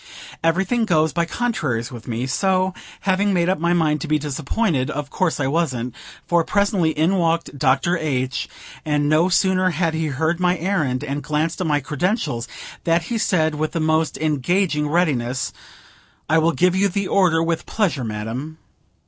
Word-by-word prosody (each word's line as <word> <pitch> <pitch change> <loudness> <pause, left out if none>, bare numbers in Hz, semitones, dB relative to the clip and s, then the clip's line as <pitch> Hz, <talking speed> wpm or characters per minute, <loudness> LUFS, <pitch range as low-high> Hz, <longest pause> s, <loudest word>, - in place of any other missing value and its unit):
Everything 190 +8 +1
goes 160 -5 +2
by 170 0 +1
contraries 150 - -2
with 120 -3 -10
me; 120 +1 -2
so, 185 +6 +1 0.3
having 200 +1 +1
made 175 0 +2
up 190 - +1
my 170 +1 +1
mind 155 -3 +2
to 165 - -4
be 155 0 +2
disappointed, 150 - -1
of 145 0 -4
course 180 -5 0
I 140 - 0
wasn't; 130 -5 -1 0.3
for, 170 -1 +2
presently, 200 -3 +1
in 160 +5 +1
walked 165 -3 0
Dr. 140 +6 +2
H., 130 -4 -2 0.3
and 145 -1 0
no 155 +4 +3
sooner 185 0 +3
had 165 -2 0
he 160 0 -1
heard 160 +4 -1
my 180 0 +2
errand, 155 -7 -1
and 145 0 -3
glanced 155 +4 -1
at 180 - 0
my 145 -1 +1
credentials, 150 - -1 0.4
than 165 0 +3
he 225 +8 -3
said, 160 -6 +2
with 155 +1 -2
the 165 - -1
most 160 0 +1
engaging 155 +1 0
readiness: 135 -7 0 0.7
"I 160 +1 +4
will 165 +1 +3
give 180 0 +2
you 200 +1 +3
the 200 +1 -2
order, 175 -4 +3
with 165 -1 -2
pleasure, 180 - 0
madam." 115 +8 -5
160 Hz, 175 wpm, -21 LUFS, 145-180 Hz, 0.7 s, I